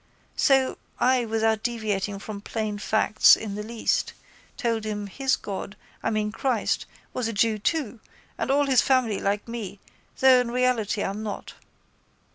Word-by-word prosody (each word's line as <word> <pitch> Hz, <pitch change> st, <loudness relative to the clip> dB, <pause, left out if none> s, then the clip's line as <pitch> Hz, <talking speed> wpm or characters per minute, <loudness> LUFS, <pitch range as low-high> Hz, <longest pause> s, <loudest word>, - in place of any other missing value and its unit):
So 270 Hz, -2 st, +3 dB, 0.2 s
I 255 Hz, -1 st, +3 dB
without 220 Hz, -1 st, +1 dB
deviating 210 Hz, -4 st, -2 dB
from 200 Hz, 0 st, -7 dB
plain 215 Hz, -1 st, -3 dB
facts 215 Hz, +1 st, +5 dB
in 215 Hz, -2 st, -6 dB
the 210 Hz, -, -4 dB
least 225 Hz, +1 st, -1 dB, 0.4 s
told 230 Hz, -4 st, -1 dB
him 210 Hz, -1 st, -3 dB
his 265 Hz, +7 st, 0 dB
God, 200 Hz, 0 st, -6 dB, 0.3 s
I -, -, 0 dB
mean 210 Hz, -1 st, -1 dB
Christ, 235 Hz, 0 st, -1 dB, 0.3 s
was 250 Hz, -3 st, -1 dB
a 230 Hz, -, -3 dB
jew 215 Hz, +1 st, +2 dB
too 255 Hz, -1 st, -1 dB, 0.4 s
and -, -, -3 dB
all 285 Hz, +1 st, +3 dB
his 265 Hz, -3 st, +4 dB
family 250 Hz, -6 st, +2 dB
like 200 Hz, +2 st, -1 dB
me 220 Hz, -4 st, -6 dB, 0.4 s
though 260 Hz, -1 st, +7 dB
in 245 Hz, -, -3 dB
reality 240 Hz, -4 st, +1 dB
I'm 200 Hz, +2 st, -3 dB
not. 215 Hz, -2 st, -6 dB
220 Hz, 155 wpm, -25 LUFS, 210-250 Hz, 0.4 s, though